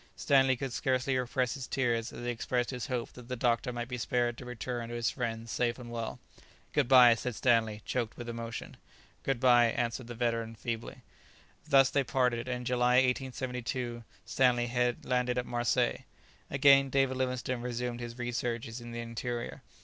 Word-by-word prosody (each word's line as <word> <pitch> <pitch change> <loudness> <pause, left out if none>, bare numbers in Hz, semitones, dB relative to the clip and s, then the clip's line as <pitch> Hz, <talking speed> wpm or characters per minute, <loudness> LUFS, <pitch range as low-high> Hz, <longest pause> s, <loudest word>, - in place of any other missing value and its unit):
Stanley 135 -2 +4
could 135 -1 -4
scarcely 130 +1 0
repress 125 0 0
his 135 -2 -6
tears 120 -3 0
as 120 - -7
he 120 - 0
expressed 120 +1 -1
his 125 -3 -4
hope 125 -2 -3
that 125 -1 -12
the 125 - -3
doctor 120 0 +1
might 120 -1 -4
be 125 -1 -5
spared 120 +1 0
to 125 - -9
return 120 -1 -4
to 120 - -5
his 120 -1 0
friends 115 -3 -4
safe 120 -1 0
and 120 -2 -9
well. 115 -1 -4 0.5
"Good 145 -4 +2
bye!" 125 -2 +8
said 115 +1 -4
Stanley, 110 -4 +2
choked 120 -3 -2
with 120 - -7
emotion. 115 0 -6 0.4
"Good 135 -3 -1
bye!" 120 -2 +6
answered 115 +1 -2
the 120 - -7
veteran 115 -1 -1
feebly. 115 +1 -5 0.7
Thus 135 -2 +6
they 140 - +2
parted, 125 -2 0
and 125 -1 -1
in - - -8
July, 125 0 +2
1872, 125 -2 -1 0.2
Stanley 125 -1 +2
landed 125 0 0
at 125 - 0
Marseilles. 120 0 0 0.5
Again 135 0 +5
David 135 0 +2
Livingstone 125 -1 -2
resumed 120 0 -3
his 120 0 -7
researches 120 -1 -3
in 120 0 -8
the 120 - -4
interior. 120 +1 -4
120 Hz, 175 wpm, -31 LUFS, 120-130 Hz, 0.7 s, bye